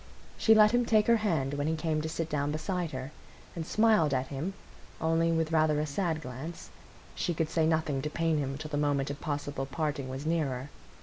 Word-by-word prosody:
She 220 - +5
let 215 0 +7
him 245 0 +3
take 215 -2 +3
her 235 0 +5
hand 160 -11 0
when 145 +1 -1
he 160 - +1
came 155 -1 -1
to 160 - -3
sit 165 0 -2
down 145 -2 -1
beside 175 +2 -2
her, 130 +1 -6 0.4
and 165 -2 -4
smiled 215 -10 +3
at 130 0 -1
him, 155 +8 -4 0.4
only 165 +1 +2
with 160 -1 0
rather 155 -2 +3
a 150 - 0
sad 160 +1 -1
glance; 135 +7 -7 0.4
she 175 - -2
could 160 0 -1
say 160 -2 +2
nothing 155 -4 +1
to 150 - -3
pain 165 -1 0
him 135 -1 -2
till 155 +1 -7
the 145 - -1
moment 145 -1 +1
of 140 - -8
possible 145 -2 -3
parting 145 -2 -2
was 135 +3 -5
nearer. 145 -5 -1
155 Hz, 210 wpm, -30 LUFS, 145-165 Hz, 0.4 s, let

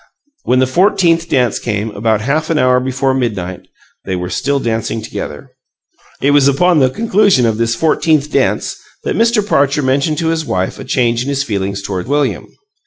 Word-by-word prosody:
When 125 - +2
the 130 - +4
fourteenth 170 +2 +2
dance 125 -5 +1
came, 105 -1 -3
about 110 +1 0
half 150 +7 -1
an 165 - +1
hour 130 -2 +3
before 130 +1 -1
midnight, 100 -8 -3 0.4
they 95 - -3
were 90 0 -4
still 140 0 0
dancing 115 -2 -2
together. 75 -8 -7 0.7
It 140 - +4
was 145 -1 +4
upon 165 +4 +3
the 130 -2 +4
conclusion 205 - +2
of 110 -1 0
this 115 0 +1
fourteenth 155 -1 +1
dance - - 0 0.3
that - - -2
Mr. 230 -2 +2
Parcher 140 -5 +2
mentioned 140 +4 0
to 160 +1 0
his 165 -1 -1
wife 95 -9 -2
a - - -6
change 120 -3 +1
in 130 - -3
his 140 0 0
feelings 100 -4 -3
toward 95 -1 -4
William. 145 -1 -1
130 Hz, 180 wpm, -15 LUFS, 115-155 Hz, 0.7 s, the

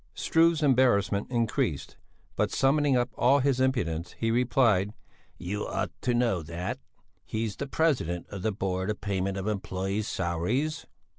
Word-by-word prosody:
Struve's 165 -1 +3
embarrassment 120 -7 +3
increased, 115 - -1 0.4
but - - +1
summoning 140 0 +2
up 120 0 0
all 130 +3 +4
his 135 -1 +1
impudence, 90 -11 0
he 115 0 0
replied, 115 -5 +2 0.4
"You 100 +4 -4
ought - - -2
to 125 -1 +1
know 115 -7 +1
that! 85 +3 -5 0.4
He's 110 0 -3
the 140 - -5
president 125 - 0
of 100 -2 -7
the 110 - 0
Board 95 -1 -2
of 105 - -2
Payment 100 -1 -2
of 95 - -4
Employés' 100 0 -2
Salaries." 95 - -1
110 Hz, 145 wpm, -28 LUFS, 95-130 Hz, 0.4 s, all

